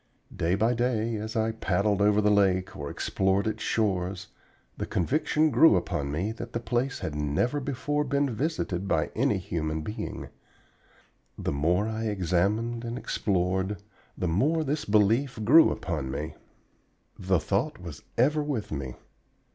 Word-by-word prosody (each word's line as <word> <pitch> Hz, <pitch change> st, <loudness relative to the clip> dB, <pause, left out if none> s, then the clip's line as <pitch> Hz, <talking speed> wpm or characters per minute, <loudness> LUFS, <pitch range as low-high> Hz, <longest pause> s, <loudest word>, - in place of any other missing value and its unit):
Day 85 Hz, +3 st, +1 dB
by 110 Hz, +4 st, +2 dB
day 115 Hz, -2 st, 0 dB
as 110 Hz, +1 st, -5 dB
I 110 Hz, 0 st, +1 dB
paddled 100 Hz, -2 st, 0 dB
over 105 Hz, +1 st, +4 dB
the 105 Hz, 0 st, +3 dB
lake 95 Hz, -2 st, +2 dB
or 70 Hz, -1 st, -5 dB
explored 95 Hz, +1 st, 0 dB
its 110 Hz, -, -2 dB
shores 95 Hz, -3 st, -1 dB, 0.5 s
the -, -, -4 dB
conviction 155 Hz, -, +1 dB
grew 140 Hz, -1 st, +6 dB
upon 75 Hz, -5 st, -1 dB
me 90 Hz, +9 st, -1 dB
that 115 Hz, +1 st, -8 dB
the 115 Hz, -, -1 dB
place 120 Hz, +3 st, -1 dB
had 80 Hz, -, -3 dB
never 75 Hz, -, 0 dB
before 145 Hz, +2 st, -1 dB
been 140 Hz, 0 st, +1 dB
visited 110 Hz, -, -2 dB
by 80 Hz, -4 st, 0 dB
any -, -, +2 dB
human 80 Hz, -5 st, -3 dB
being. 105 Hz, -, -5 dB, 1.1 s
The -, -, -2 dB
more 85 Hz, +9 st, +1 dB
I 110 Hz, 0 st, -3 dB
examined 105 Hz, +4 st, 0 dB
and 120 Hz, +1 st, -4 dB
explored, 95 Hz, -3 st, -1 dB, 0.4 s
the 90 Hz, -, -1 dB
more 145 Hz, -, +2 dB
this 150 Hz, +1 st, -2 dB
belief 110 Hz, +6 st, +2 dB
grew 155 Hz, +9 st, +7 dB
upon 75 Hz, -6 st, -3 dB
me. 75 Hz, +4 st, -4 dB, 0.9 s
The 95 Hz, -1 st, +2 dB
thought 100 Hz, -, -1 dB
was 85 Hz, -6 st, -9 dB, 0.2 s
ever 150 Hz, +6 st, +3 dB
with 140 Hz, -8 st, -3 dB
me. 65 Hz, -4 st, -4 dB
105 Hz, 150 wpm, -27 LUFS, 90-120 Hz, 1.1 s, grew